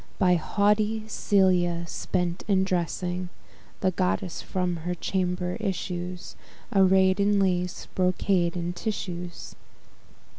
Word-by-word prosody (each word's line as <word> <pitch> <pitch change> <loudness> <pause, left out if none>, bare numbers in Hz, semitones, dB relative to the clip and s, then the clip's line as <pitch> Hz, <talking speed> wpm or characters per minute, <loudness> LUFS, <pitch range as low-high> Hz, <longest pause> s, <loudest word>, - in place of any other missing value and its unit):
By 185 -3 +4
haughty 210 +5 +1
Celia 180 -5 +2
spent 175 +1 -2
in 190 -2 +3
dressing; 180 0 -2 0.5
The 190 - +2
goddess 185 0 -1
from 180 -2 -2
her 175 +2 -3
chamber 180 0 -1
issues, 180 -3 -4 0.4
Array'd 190 0 +4
in 200 0 +3
lace, 180 -2 0
brocades, 180 -1 +1
and 175 0 -3
tissues. 180 -3 -5
180 Hz, 105 wpm, -26 LUFS, 175-195 Hz, 0.5 s, By